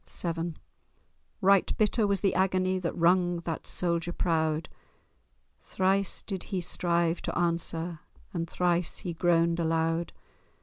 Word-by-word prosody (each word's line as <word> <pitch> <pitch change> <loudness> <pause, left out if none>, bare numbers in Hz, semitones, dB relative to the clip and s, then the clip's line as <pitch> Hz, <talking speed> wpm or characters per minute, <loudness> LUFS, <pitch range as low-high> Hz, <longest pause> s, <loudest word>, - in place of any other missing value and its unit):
VII 170 -1 -3 0.9
Right 195 0 +4
bitter 215 0 +2
was 200 -2 0
the 195 - +2
agony 185 0 +1
That 175 -2 -3
wrung 175 0 +3
that 165 -2 -5
soldier 170 -1 -1
proud; 160 -2 0 0.9
Thrice 195 +1 0
did 195 -3 -4
he 190 -3 -2
strive 170 -1 0
to - - -3
answer, 170 -1 -1 0.3
And 165 -1 -3
thrice 175 -1 +1
he 180 -4 -4
groaned 170 0 +2
aloud. 165 0 0
175 Hz, 125 wpm, -29 LUFS, 165-185 Hz, 0.9 s, Right